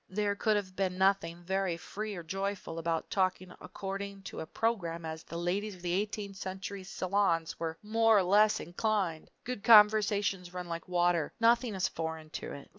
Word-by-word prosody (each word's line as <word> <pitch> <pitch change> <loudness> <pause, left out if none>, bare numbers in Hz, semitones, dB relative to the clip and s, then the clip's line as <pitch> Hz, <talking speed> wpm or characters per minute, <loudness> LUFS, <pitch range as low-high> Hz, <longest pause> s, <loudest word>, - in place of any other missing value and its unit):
There 205 +1 0
could 215 +1 +2
have 190 -3 -3
been 185 -1 -1
nothing 185 -3 +1
very 190 -1 -1
free 210 +4 -5
or 175 - -6
joyful 195 -1 -4
about 165 0 -2
talking 185 -1 0
according 195 0 -6
to - - -7
a 160 - -5
program 170 -6 -1
as 160 0 -5
the 170 - -7
ladies 190 +4 -1
of 180 - -16
the 175 -1 -1
eighteenth 200 0 -2
century 190 +1 -5
salons 185 -3 0
were 165 -1 -3
more 225 +1 +4
or 195 - +4
less 210 +4 +4
inclined. 180 -2 -1
Good 250 -5 -5
conversation 210 -3 +5
runs 180 -1 -6
like 170 -1 -5
water; 175 -3 +1
nothing 230 -1 +3
is 185 - +1
foreign 160 -1 -5
to - - -5
it. 140 - -9
190 Hz, 180 wpm, -31 LUFS, 170-205 Hz, -, conversation